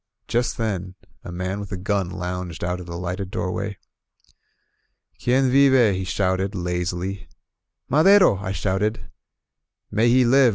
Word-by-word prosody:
Just 120 0 0
then 95 -5 -3 0.3
a - - -7
man 90 +3 -3
with 100 -1 -7
a 95 - -3
gun 95 -1 -1
lounged 90 -3 -5
out 90 +1 -2
of 90 - -9
the 85 0 -6
lighted 90 +2 -4
doorway. 100 +1 -3 1.5
"Quien 130 +1 +3
vive?" 130 -5 +5
he 95 0 -3
shouted, 95 +1 -1
lazily. 90 +2 -3 0.6
"Madero!" 180 - +5
I 95 0 -4
shouted. 100 +4 -2 0.8
^^ay 110 +3 +3
he 125 +1 +5
live 130 +1 +5
95 Hz, 135 wpm, -23 LUFS, 90-115 Hz, 1.5 s, vive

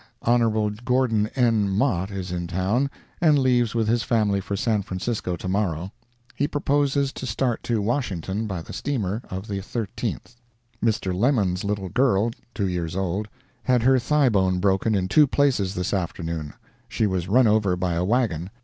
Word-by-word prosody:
Hon. 110 -3 +2
Gordon 125 -4 +2
N. 115 -6 +2
Mott 95 -3 +1
is 95 -2 -5
in 85 -1 -3
town, 95 +10 0 0.3
and 155 -4 +5
leaves 125 -4 +2
with 115 -2 +1
his 115 +1 +2
family 105 -4 +1
for 100 - -4
San 105 +1 +1
Francisco 95 0 -3
to 90 - -7
morrow. 95 -2 -1 0.4
He 145 - 0
proposes 140 -1 +1
to 130 - -6
start 120 +1 -1
to 115 -4 0
Washington 105 - -2
by 95 -5 -4
the - - -10
steamer 110 -6 -2
of 95 +3 -5
the 100 -1 -3
13th. 115 +3 -5 0.5
Mr. 105 -5 +1
Lemmon's 100 -4 +1
little 100 -2 -2
girl, 115 -1 +2 0.2
two 100 - 0
years 85 -2 -3
old, 95 +2 -1 0.3
had 125 -3 +2
her 130 +1 +5
thigh 140 +1 +3
bone 95 -4 +2
broken 100 +3 +2
in 95 -2 0
two 150 +9 +5
places 125 -10 +1
this 90 +2 -2
afternoon; 85 -5 -3 0.3
she 110 - 0
was 95 -3 -1
run 125 +6 +4
over 105 -4 +3
by 90 -1 -1
a 85 +1 0
wagon. 95 -6 0
105 Hz, 170 wpm, -24 LUFS, 95-120 Hz, 0.5 s, and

